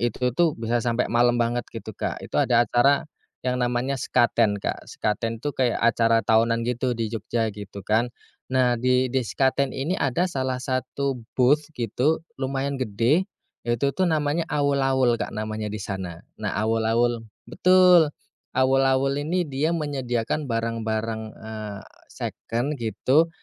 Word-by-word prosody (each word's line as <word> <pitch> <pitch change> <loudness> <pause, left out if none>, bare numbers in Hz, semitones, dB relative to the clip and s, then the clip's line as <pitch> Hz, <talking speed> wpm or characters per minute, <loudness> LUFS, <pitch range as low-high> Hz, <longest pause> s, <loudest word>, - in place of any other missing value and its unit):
itu 120 +1 0
tuh 170 +2 +3
bisa 115 +1 0
sampe 120 0 +1
malam 120 +1 +3
banget 120 +1 +1
gitu, 110 -1 -7
Kak. - - -3
Itu - - -5
ada 120 0 +4
acara 135 +6 +3 0.4
yang 125 0 +1
namanya 125 +2 0
Sekaten, 115 -4 +2
Kak. - - -3
Sekaten 115 +2 -2
tuh 145 +1 -3
kayak 125 -2 +1
acara 115 0 +3
tahunan 115 +1 +3
gitu 125 +1 0
di 115 - 0
Jogja 115 +1 -1
gitu 100 -1 -8
kan. 115 +3 +2 0.4
Nah 125 -2 +3
di 125 +2 +2
di 130 +1 0
Sekaten 135 +3 +1
ini 145 +7 -2
ada 145 +5 +1
salah 130 -4 -2
satu, 130 0 -2 0.2
booth 135 +4 +4 0.2
gitu 125 +7 +1 0.2
lumayan 135 +1 -1
gede, 125 - +1 0.4
yaitu 120 +4 0
tuh 190 - +2
namanya 155 +1 +1
awul-awul, 135 -4 +2
Kak, - - -4
namanya 110 0 -4
di 105 - -4
sana. 90 -4 -5 0.2
Nah 105 - -1
Awul-awul 115 +2 +1 0.3
betul, 180 -4 +5 0.5
awul-awul 135 +1 +3
ini 175 +4 0
dia 140 +2 -1
menyediakan 140 -2 -2
barang-barang, 115 -1 -2 0.2
eee, 110 -2 -7 0.3
second 120 +6 -3
gitu, 130 - +2
120 Hz, 145 wpm, -24 LUFS, 115-135 Hz, 0.5 s, betul